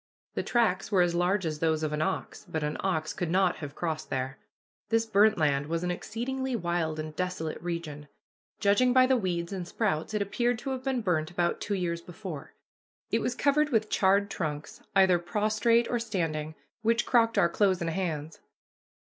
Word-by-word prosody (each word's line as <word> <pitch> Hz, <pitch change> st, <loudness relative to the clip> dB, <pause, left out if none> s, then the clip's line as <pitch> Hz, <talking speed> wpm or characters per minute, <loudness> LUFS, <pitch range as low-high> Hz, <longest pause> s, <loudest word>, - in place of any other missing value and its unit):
The -, -, -1 dB
tracks 215 Hz, -5 st, +1 dB
were 185 Hz, -3 st, +5 dB
as 175 Hz, -1 st, +1 dB
large 180 Hz, +2 st, +1 dB
as 155 Hz, -2 st, -2 dB
those 160 Hz, -1 st, +1 dB
of 155 Hz, -1 st, -1 dB
an 150 Hz, -, -1 dB
ox, 155 Hz, -, -2 dB
but 160 Hz, -1 st, -2 dB
an 150 Hz, 0 st, -1 dB
ox 160 Hz, -5 st, -1 dB
could 175 Hz, -, -3 dB
not 185 Hz, +1 st, +2 dB
have 145 Hz, -2 st, -7 dB
crossed 160 Hz, -2 st, -3 dB
there. 130 Hz, +1 st, -3 dB, 0.5 s
This 225 Hz, 0 st, +2 dB
burnt 215 Hz, 0 st, +4 dB
land 145 Hz, -3 st, +1 dB
was 165 Hz, +2 st, -2 dB
an 180 Hz, -, 0 dB
exceedingly 255 Hz, +7 st, -3 dB
wild 170 Hz, -5 st, -1 dB
and 155 Hz, 0 st, -5 dB
desolate 180 Hz, -3 st, -3 dB
region. 165 Hz, -4 st, -5 dB, 0.5 s
Judging 225 Hz, +5 st, +4 dB
by 255 Hz, 0 st, +6 dB
the 260 Hz, 0 st, +3 dB
weeds 180 Hz, -5 st, -2 dB
and 180 Hz, -3 st, -4 dB
sprouts, 200 Hz, -2 st, -1 dB
it 210 Hz, -, +1 dB
appeared 240 Hz, +4 st, 0 dB
to 270 Hz, +3 st, -4 dB
have 260 Hz, -1 st, -4 dB
been 265 Hz, -2 st, 0 dB
burnt 160 Hz, -5 st, 0 dB
about 175 Hz, -1 st, -1 dB
two 205 Hz, -, -1 dB
years 170 Hz, -3 st, -2 dB
before. 175 Hz, -4 st, -8 dB, 0.6 s
It -, -, +2 dB
was -, -, -1 dB
covered 300 Hz, +1 st, +2 dB
with 220 Hz, -5 st, +1 dB
charred 200 Hz, +1 st, +3 dB
trunks, 150 Hz, -3 st, -4 dB
either 190 Hz, -2 st, +5 dB
prostrate 215 Hz, +6 st, +2 dB
or 240 Hz, -, 0 dB
standing, 165 Hz, -8 st, -2 dB, 0.3 s
which 230 Hz, +1 st, +2 dB
crocked 230 Hz, -2 st, +3 dB
our 170 Hz, -, +5 dB
clothes 190 Hz, 0 st, +2 dB
and 165 Hz, -1 st, -1 dB
hands. 160 Hz, -4 st, -3 dB
180 Hz, 190 wpm, -29 LUFS, 160-220 Hz, 0.6 s, by